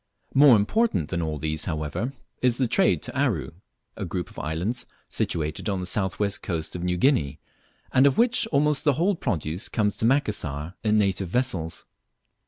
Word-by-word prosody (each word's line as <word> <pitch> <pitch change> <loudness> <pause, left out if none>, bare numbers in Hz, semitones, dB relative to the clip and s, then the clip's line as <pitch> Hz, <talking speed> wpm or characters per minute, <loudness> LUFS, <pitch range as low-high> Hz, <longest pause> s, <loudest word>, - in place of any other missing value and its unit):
More 140 -2 +8
important 105 - +1
than 85 -2 -1
all 80 -2 -2
these 75 +1 -3
however 80 - -3 0.3
is 125 -1 +2
the 130 - +2
trade 190 +11 +2
to - - -7
Aru, 125 - 0 0.4
a - - -5
group - - -4
of - - -9
islands 90 +11 -2 0.2
situated 80 +5 -2
on 95 -2 -1
the 90 - -4
south 95 0 -1
west 100 -1 -1
coast 80 -3 -4
of 90 - -4
New 90 0 0
Guinea, 85 - +2 0.6
and 130 +2 +6
of 140 - +1
which 240 0 +3
almost 150 -3 +2
the 145 - +4
whole 175 +9 +2
produce 90 - -2
comes 105 -2 0
to - - 0
Macassar 90 - 0
in 110 -1 +3
native 95 -3 +1
vessels. 95 -8 -2
100 Hz, 180 wpm, -25 LUFS, 80-135 Hz, 0.6 s, More